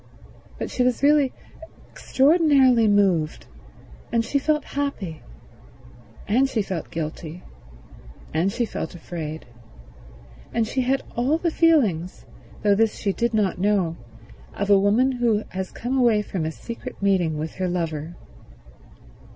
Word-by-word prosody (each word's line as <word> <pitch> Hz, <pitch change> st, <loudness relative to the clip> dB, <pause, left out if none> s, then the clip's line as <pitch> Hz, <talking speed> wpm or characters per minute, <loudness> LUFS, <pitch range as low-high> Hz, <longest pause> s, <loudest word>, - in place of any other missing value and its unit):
But -, -, -5 dB
she -, -, -2 dB
was 250 Hz, +1 st, +1 dB
really 285 Hz, -2 st, +4 dB, 0.6 s
extraordinarily 270 Hz, -5 st, +4 dB
moved, 190 Hz, -7 st, +2 dB, 0.7 s
and 230 Hz, -1 st, +1 dB
she 280 Hz, -, 0 dB
felt 300 Hz, +1 st, 0 dB
happy, 245 Hz, -, -3 dB, 1.1 s
and 255 Hz, +6 st, +3 dB
she 220 Hz, -5 st, 0 dB
felt 185 Hz, -5 st, -5 dB
guilty, 160 Hz, +1 st, -6 dB, 0.9 s
and 170 Hz, +5 st, +1 dB
she 240 Hz, +3 st, -1 dB
felt 175 Hz, -5 st, -5 dB
afraid, 160 Hz, -2 st, -6 dB, 1.1 s
and 230 Hz, -1 st, 0 dB
she 260 Hz, -, -1 dB
had 265 Hz, +2 st, 0 dB
all 260 Hz, +6 st, +1 dB
the 335 Hz, 0 st, -1 dB
feelings, 225 Hz, -, +2 dB, 0.4 s
though 205 Hz, -1 st, +4 dB
this 220 Hz, +2 st, +2 dB
she 200 Hz, -2 st, -1 dB
did 235 Hz, +1 st, -1 dB
not 200 Hz, -4 st, +1 dB
know, 190 Hz, -4 st, +1 dB, 0.6 s
of 200 Hz, 0 st, -1 dB
a 200 Hz, -, +7 dB
woman 220 Hz, +7 st, +3 dB
who 235 Hz, -4 st, +1 dB
was 190 Hz, 0 st, -3 dB
come 255 Hz, +3 st, -2 dB
away 225 Hz, -4 st, +3 dB
from 180 Hz, -6 st, -3 dB
a 160 Hz, -, -2 dB
secret 230 Hz, +8 st, -8 dB
meeting 180 Hz, -6 st, +2 dB
with 155 Hz, +1 st, -4 dB
her 185 Hz, -1 st, -1 dB
lover. 165 Hz, -2 st, -3 dB
210 Hz, 135 wpm, -23 LUFS, 175-255 Hz, 1.1 s, a